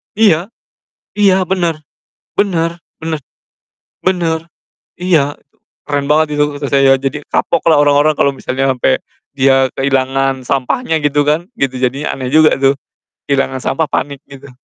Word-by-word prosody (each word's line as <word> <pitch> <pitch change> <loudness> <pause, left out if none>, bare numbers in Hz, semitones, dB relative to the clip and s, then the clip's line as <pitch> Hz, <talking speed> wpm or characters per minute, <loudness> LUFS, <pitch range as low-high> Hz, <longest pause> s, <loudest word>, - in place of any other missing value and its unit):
Iya. 200 -5 +3 0.7
Iya 200 -2 +4
bener. 175 -4 0 0.6
Bener 170 -5 +1 0.3
bener. 160 -1 -3 0.8
Bener, 170 -3 -1 0.4
iya, 160 -6 +1
itu 140 - -42 0.3
keren 145 -1 -1
banget 150 -1 +2
itu - - +4
maksud 145 -1 -5
saya, 135 -1 +5
jadi 135 +2 -2
kapok 170 - 0
lah 155 -3 +5
orang-orang 145 +1 +3
kalau 140 - +2
misalnya 135 0 -2
sampe 125 - +1 0.3
dia 135 0 +4
kehilangan 135 -1 0
sampahnya 160 - -1
gitu 145 0 +1
kan, 160 +6 0
gitu, 135 -1 0
jadinya 135 +3 -1
aneh 130 -2 -5
juga 155 +2 +5
tuh. 135 +1 +1 0.5
Kehilangan 135 -2 0
sampah 160 -1 0
panik, 140 -1 -3
gitu. 140 0 -13
145 Hz, 140 wpm, -15 LUFS, 135-160 Hz, 0.8 s, saya